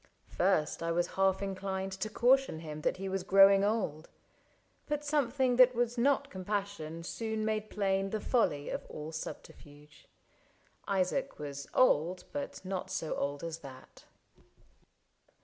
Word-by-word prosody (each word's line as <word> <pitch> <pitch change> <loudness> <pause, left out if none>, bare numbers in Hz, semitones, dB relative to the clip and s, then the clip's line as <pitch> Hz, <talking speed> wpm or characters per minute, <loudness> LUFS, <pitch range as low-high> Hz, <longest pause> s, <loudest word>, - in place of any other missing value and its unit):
First 175 -5 +1
I 165 0 -1
was 175 +1 0
half 195 0 +2
inclined 195 0 -3
To 190 +3 -4
caution 245 -6 +3
him 155 -2 -7
that - - 0
he 195 +1 -4
was 190 0 -1
growing 195 +1 +6
old. 200 -8 -1 0.8
But 295 0 -2
something 265 -3 +1
that 255 -1 +7
was 240 0 0
not 275 +3 +2
compassion 190 -4 -4
soon 220 +3 -3
Made 215 -1 -1
plain 195 -1 0
the 215 - -2
folly 200 - +1
of - - -4
all 155 +1 -7
subterfuge. 150 -1 -10 0.8
Isaac 200 +8 0
was 140 -1 -6
old, 180 -7 +3
but 285 -8 -5
not 185 -1 -3
so 160 - -2
old 140 +1 -3
as 165 -1 -4
that. 130 -4 -13
195 Hz, 140 wpm, -32 LUFS, 165-225 Hz, 0.8 s, that